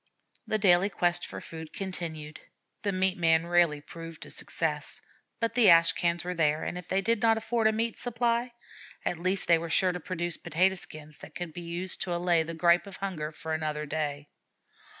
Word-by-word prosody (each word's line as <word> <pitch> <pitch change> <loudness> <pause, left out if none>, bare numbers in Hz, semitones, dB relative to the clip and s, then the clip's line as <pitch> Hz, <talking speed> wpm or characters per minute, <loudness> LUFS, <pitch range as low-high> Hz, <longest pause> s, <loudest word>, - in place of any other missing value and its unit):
The 215 - +1
daily 195 -1 +4
quest 175 -2 0
for - - -7
food 160 -1 -9
continued. 160 -5 -5 0.4
The 200 - 0
meat 185 -1 +1
man 165 -1 +3
rarely 170 -4 +3
proved 165 +1 -9
a - - -11
success, - - -2 0.4
but 230 -1 0
the 235 -5 +6
ash 165 -1 +7
cans 170 0 0
were 180 +1 -3
there, 155 -3 +1
and - - -3
if 180 -1 -7
they 190 +3 +1
did 230 +2 +1
not 225 -1 +4
afford 225 0 +1
a - - +4
meat 225 +1 -1
supply, 240 0 0 0.5
at 175 - -1
least 185 +2 +1
they 170 -1 +5
were 165 0 -5
sure 185 +3 +3
to 180 - -5
produce 175 -1 -3
potato 175 +3 +2
skins 155 -4 -8
that - - -12
could 175 -3 -5
be 175 - -6
used 175 +2 -4
to 175 -2 -1
allay 175 -1 +2
the 165 +1 -4
gripe 170 +2 +3
of 195 - -8
hunger 165 -6 -4
for 160 +1 -5
another 155 -1 -2
day. 145 -1 -3
175 Hz, 200 wpm, -29 LUFS, 160-190 Hz, 0.5 s, ash